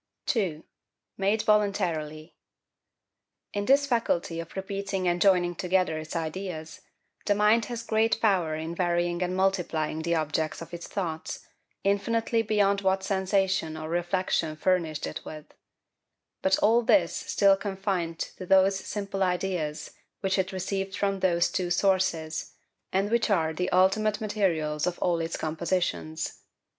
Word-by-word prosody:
2. 180 -10 -1 0.5
Made 200 +3 +1
voluntarily. 175 -7 0 1.2
In 205 0 -2
this 275 +3 +4
faculty 225 -10 0
of 165 0 -8
repeating 195 -1 -3
and 175 0 +1
joining 180 -3 +4
together 180 -2 0
its 155 +2 -7
ideas, 160 -1 -5 0.5
the 205 - +3
mind 210 +2 +4
has 235 -1 -5
great 225 0 +1
power 180 -8 +2
in 160 +2 -4
varying 175 0 0
and 180 0 -1
multiplying 175 -5 0
the 170 +1 0
objects 155 0 -1
of 165 - -10
its 170 0 -6
thoughts, 165 -5 -4 0.4
infinitely 225 +3 +1
beyond 205 -2 +2
what 190 0 +1
sensation 190 -4 0
or 155 0 -6
reflection 175 -2 0
furnished 160 -2 0
it - - -5
with: 155 -1 -9 1.0
but 190 0 +3
all 230 +3 +5
this 205 -8 +3
still 200 -1 +3
confined 190 -4 -2
to 185 - -6
those 190 +1 +5
simple 195 0 -4
ideas 180 -4 -1 0.3
which 195 -1 +1
it 190 +1 0
received 195 +1 -3
from 195 -1 0
those 175 -2 +2
two 180 -2 -1
sources, 175 -4 0 0.4
and 195 +3 0
which 235 -1 +2
are 160 -6 +2
the 180 +3 -1
ultimate 195 +3 +3
materials 175 -8 0
of 180 - -2
all 175 -2 +1
its 165 0 -3
compositions. 160 0 -2
185 Hz, 140 wpm, -27 LUFS, 165-200 Hz, 1.2 s, all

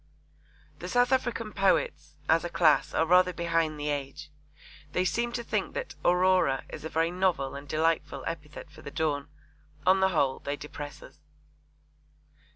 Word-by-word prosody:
The - - -6
South 245 +1 +3
African 235 -4 0
poets, 190 -6 +1
as 165 +1 +4
a 175 - -3
class, 160 -4 +3
are 160 - +3
rather 180 +2 +4
behind 165 -3 0
the 150 0 -2
age. 145 +1 -4 0.6
They 180 - +1
seem 235 +5 0
to 240 - -3
think - - -2
that - - -4
'Aurora' 180 -6 +3
is - - -8
a 160 - -4
very 165 +2 +1
novel 180 -7 0
and 140 +1 -8
delightful 155 -3 0
epithet 150 -2 -7
for - - -14
the - - -7
dawn. 145 -2 -1 0.6
On 190 +1 +5
the 190 0 +4
whole 140 -7 +1
they 140 - -3
depress 145 0 -8
us. - - -15
165 Hz, 165 wpm, -28 LUFS, 145-185 Hz, 0.6 s, On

